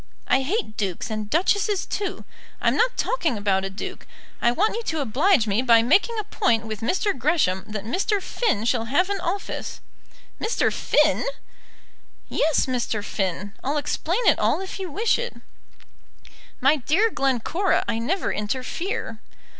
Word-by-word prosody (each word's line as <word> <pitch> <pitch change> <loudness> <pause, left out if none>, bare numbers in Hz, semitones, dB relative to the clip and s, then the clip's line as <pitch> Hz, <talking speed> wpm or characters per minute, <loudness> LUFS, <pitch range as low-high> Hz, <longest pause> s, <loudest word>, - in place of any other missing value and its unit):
I 265 - +3
hate 295 - -2
dukes 195 +2 -3
and 215 -1 -3
duchesses 395 - +1
too. 400 -3 -4 0.3
I'm - - +2
not - - +2
talking 330 - 0
about 195 -2 +1
a 195 - -2
duke. 195 - -7 0.3
I 235 - +4
want 410 - +1
you 465 - -2
to 320 -8 -2
oblige 280 - +3
me 210 +2 +1
by 230 -3 +5
making 395 - +3
a 430 - -1
point 235 - +1
with 220 -2 -5
Mr. 375 - 0
Gresham 255 - +1
that 210 -2 -5
Mr. 390 - 0
Finn 370 - -1
shall 230 -1 +1
have 360 - +1
an 400 - -1
office." 375 +3 -4 0.6
"Mr. 440 - +1
Finn!" - - +2 1.1
"Yes, 315 -2 +2
Mr. 235 -5 -2
Finn. 195 0 -3
I'll 285 +3 0
explain 340 - -1
it - - +5
all - - +2
if 385 +1 -6
you 375 -2 -4
wish 440 +11 +1
it." 485 0 -4 1.2
"My 275 +4 +4
dear 355 - +2
Glencora, 275 - +1
I 225 - 0
never 335 +12 -1
interfere." 250 - -3
280 Hz, 155 wpm, -24 LUFS, -, 1.2 s, by